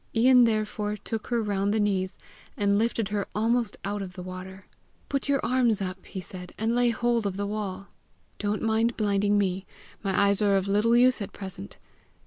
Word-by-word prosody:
Ian, 250 +1 +6
therefore, 210 -1 -1
took 220 +1 -5
her 235 -2 0
round 200 -1 0
the 220 - +1
knees, 195 -2 0 0.4
and 200 0 +2
lifted 225 -2 0
her 205 -1 -2
almost 230 +1 +1
out 205 +1 -2
of 185 -2 -6
the 180 -1 -8
water. 185 +1 -8 0.4
"Put 275 0 -2
your 275 -1 +3
arms 245 -4 +2
up," 185 -1 -5
he 190 - -6
said, 180 0 -8
"and 225 +2 0
lay 245 0 +3
hold 235 -1 +1
of 195 -1 -4
the 200 - -1
wall. 200 -2 -4 0.5
Don't 205 0 -1
mind 225 +1 +1
blinding 205 -1 +2
me; 190 -1 0 0.3
my 195 -2 0
eyes 200 0 +3
are 200 -1 +4
of 190 0 -1
little 210 +4 +3
use 250 -1 +4
at 200 - -5
present. 190 - -7
205 Hz, 190 wpm, -27 LUFS, 195-230 Hz, 0.5 s, Ian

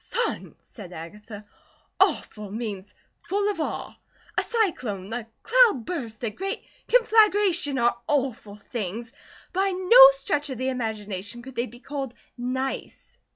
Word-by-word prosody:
"Son," 480 - -2
said 195 -6 -11
Agatha, 210 +6 -9 0.5
"'awful,' 210 -2 +1
means 210 -2 -5 0.3
full 405 +1 -1
of 330 - -4
awe. - - -4 0.4
A - - +3
cyclone, 235 - -1
a 240 -2 -4 0.2
cloudburst, 335 - +2
a 225 - -1
great 390 - -4 0.2
conflagration 415 - +4
are 240 -1 +2
awful 260 -8 -1
things. 225 +2 -6 0.4
By 385 +2 +2
no 385 +7 +9
stretch 295 -12 -1
of 260 - -5
the 260 +2 -1
imagination 220 -3 -4
could 265 0 -11
they 240 +2 -1
be 240 +3 -14
called 275 -2 -5 0.2
nice." 260 +2 -4
255 Hz, 130 wpm, -25 LUFS, -, 0.5 s, no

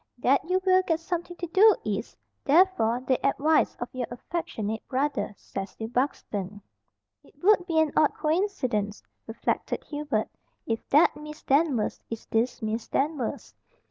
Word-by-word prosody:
That 260 +3 +3
you 370 +1 +3
will 370 0 +5
get 325 -3 0
something 345 +1 -4
to 350 - -3
do 395 +6 +6
is, - - -3 0.3
therefore, 280 -7 +3
the 260 0 0
advice 300 +3 +2
of 240 - -5
your 255 -2 -3
affectionate 225 -6 -4
brother, 275 -5 -1
Cecil 195 +3 -6
Buxton." 210 -6 -2 0.6
"It - - -22
would 380 -2 +4
be 325 -2 +2
an 315 -2 +3
odd 305 - +3
coincidence," 300 - -1 0.2
reflected 225 - -2
Hubert, 290 -8 -2 0.4
"if 225 -1 -2
that 295 +4 +5
Miss 300 +1 -10
Danvers 275 -5 +1
is 225 -1 -6
this 230 +2 0
Miss 220 +1 -2
Danvers." 280 -4 -2
275 Hz, 140 wpm, -27 LUFS, 225-330 Hz, 0.6 s, do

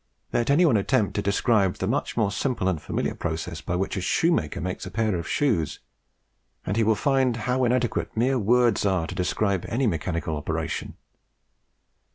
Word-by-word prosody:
Let 120 - +1
any 155 +6 +5
one 130 -9 +4
attempt 105 +1 +1
to 105 - -1
describe 100 -1 +2
the - - -3
much - - -1
more 105 -4 +2
simple 115 -2 -1
and 85 -5 0
familiar - - -2
process 80 -1 -4
by 90 - -3
which 95 +2 -1
a 95 - -2
shoemaker 90 - +1
makes 90 +1 -4
a - - -5
pair 110 -2 0
of 85 -1 -4
shoes, 110 - 0 0.9
and 100 - -1
he 115 - +2
will 110 0 +3
find 130 +1 +2
how 125 +3 0
inadequate 120 0 0
mere 130 +3 +2
words 120 +1 +3
are 95 -5 +1
to 90 - -6
describe 95 +1 0
any 125 +4 0
mechanical 85 -4 -1
operation. 80 +2 -3
105 Hz, 180 wpm, -25 LUFS, 90-125 Hz, 0.9 s, any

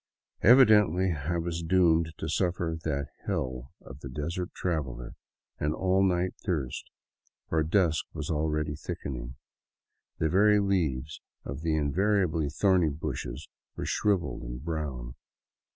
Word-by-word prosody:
Evidently 105 - +6
I 80 +3 -2
was 85 0 -2
doomed 85 -2 +3
to - - -4
suffer 85 0 0
that 70 -2 -2 0.2
hell 65 0 -3
of 70 0 -11
the 65 - -8
desert 85 +7 -4
traveler, 65 -9 -3 0.5
an 75 +1 0
all 95 0 +2
night 90 -1 +1
thirst; 75 -10 -3 0.6
for 80 - +2
dusk 80 -1 +2
was 80 -1 -4
already 75 -1 0
thickening. 60 -3 -6 0.8
The 80 - +1
very 105 +5 +5
leaves 80 -8 -1 0.2
of 70 +1 -5
the 80 -1 0
invariably 80 0 +1
thorny 90 +1 +3
bushes 70 -3 -5 0.3
were - - -4
shrivelled 100 -5 0
and - - -7
brown. 70 -7 -4
80 Hz, 125 wpm, -28 LUFS, 70-90 Hz, 0.8 s, Evidently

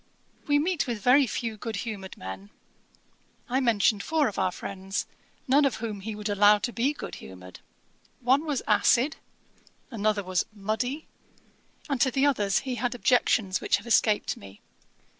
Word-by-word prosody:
We 290 0 +4
meet 330 0 0
with 235 -3 -3
very 265 +2 +5
few 225 0 -3
good 225 +1 -5
humoured 200 -4 -6
men.' 95 +2 -8 1.0
I 255 +2 +1
mentioned 220 -4 +2
four 315 +1 +1
of 210 - -4
our - - +1
friends, 195 +1 -4 0.4
none 280 +3 +4
of 275 -4 +2
whom 220 -3 -5
he 210 +2 -6
would 210 0 -5
allow 205 0 +5
to 240 +3 -4
be 250 +5 +1
good 295 - -8
humoured. 90 -1 -11 0.6
One 260 +4 +3
was 285 -4 -1
acid, 240 +6 +3 0.7
another 215 -2 0
was 185 -1 0
muddy, 220 +8 -3 0.8
and 275 -5 -1
to 260 - +4
the 270 +2 +1
others 210 -9 +2
he 255 -2 -3
had 245 -1 -1
objections 225 -5 +2
which - - +2
have 205 - -12
escaped 220 -2 +2
me. 100 0 -13
225 Hz, 160 wpm, -27 LUFS, 200-260 Hz, 1.0 s, very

